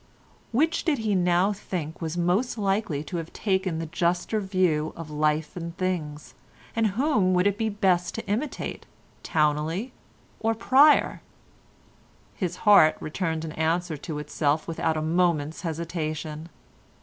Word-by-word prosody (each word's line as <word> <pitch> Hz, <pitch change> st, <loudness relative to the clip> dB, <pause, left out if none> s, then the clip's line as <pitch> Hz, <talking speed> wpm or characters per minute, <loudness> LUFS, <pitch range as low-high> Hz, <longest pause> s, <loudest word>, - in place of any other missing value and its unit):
Which 320 Hz, +7 st, +1 dB
did 310 Hz, -5 st, +1 dB
he 220 Hz, -3 st, -1 dB
now 180 Hz, +2 st, +3 dB
think 175 Hz, -5 st, -5 dB
was 165 Hz, +1 st, -3 dB
most 180 Hz, +9 st, +1 dB
likely 195 Hz, -7 st, 0 dB
to 175 Hz, -, -5 dB
have 165 Hz, 0 st, -5 dB
taken 190 Hz, -4 st, 0 dB
the 165 Hz, -, -3 dB
juster 175 Hz, +5 st, 0 dB
view 185 Hz, -6 st, 0 dB
of 165 Hz, -2 st, -8 dB
life 150 Hz, +1 st, 0 dB
and 170 Hz, 0 st, -6 dB
things, 160 Hz, -6 st, -3 dB, 0.4 s
and 225 Hz, -1 st, +3 dB
whom 215 Hz, -10 st, +2 dB
would 180 Hz, +1 st, +3 dB
it 205 Hz, -1 st, +3 dB
be 220 Hz, +1 st, -1 dB
best 190 Hz, -4 st, +1 dB
to 225 Hz, -, -5 dB
imitate, 230 Hz, +9 st, -3 dB, 0.3 s
Towneley 155 Hz, -, 0 dB, 0.5 s
or 225 Hz, 0 st, +1 dB
Pryer? 270 Hz, +6 st, +4 dB, 1.1 s
His 180 Hz, -4 st, -3 dB
heart 175 Hz, -7 st, +7 dB
returned 160 Hz, 0 st, -3 dB
answer 165 Hz, +1 st, 0 dB
to 150 Hz, +1 st, -6 dB
itself 150 Hz, +1 st, -1 dB
without 160 Hz, -1 st, -1 dB
a 155 Hz, -, -1 dB
moment's 160 Hz, -2 st, +1 dB
hesitation. 160 Hz, -1 st, -4 dB
175 Hz, 135 wpm, -26 LUFS, 155-200 Hz, 1.1 s, heart